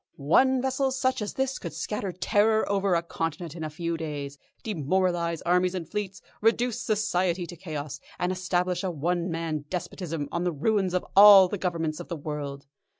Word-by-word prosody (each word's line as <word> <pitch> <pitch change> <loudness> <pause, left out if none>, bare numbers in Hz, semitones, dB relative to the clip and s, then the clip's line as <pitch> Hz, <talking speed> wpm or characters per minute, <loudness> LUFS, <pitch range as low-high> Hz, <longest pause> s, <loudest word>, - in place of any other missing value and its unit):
One 255 - +3
vessel 265 +1 +1
such 260 -1 0
as 210 - -4
this 265 0 -1
could - - -6
scatter 210 -2 -3
terror 210 +4 +2
over 195 -2 +1
a 170 - +1
continent 165 -1 -4
in 165 - -6
a 155 - -3
few 165 +2 -3
days, 145 -3 -5 0.2
demoralise 175 -2 0
armies 180 +1 +2
and 170 -4 -4
fleets, 200 -2 -5 0.2
reduce 235 +2 +1
Society 190 -6 0
to 175 - -9
chaos, 150 -4 -6 0.2
and 180 +1 0
establish 180 0 -1
a 190 - 0
one 175 +2 -1
man 165 -3 -3
despotism 165 -4 -4
on 170 - -1
the 180 - +1
ruins 185 +4 0
of 180 - 0
all 200 -1 +10
the 200 +2 -4
Governments 165 -4 -2
of - - -8
the 170 - -4
world. 145 -2 -5
180 Hz, 180 wpm, -27 LUFS, 165-205 Hz, 0.2 s, all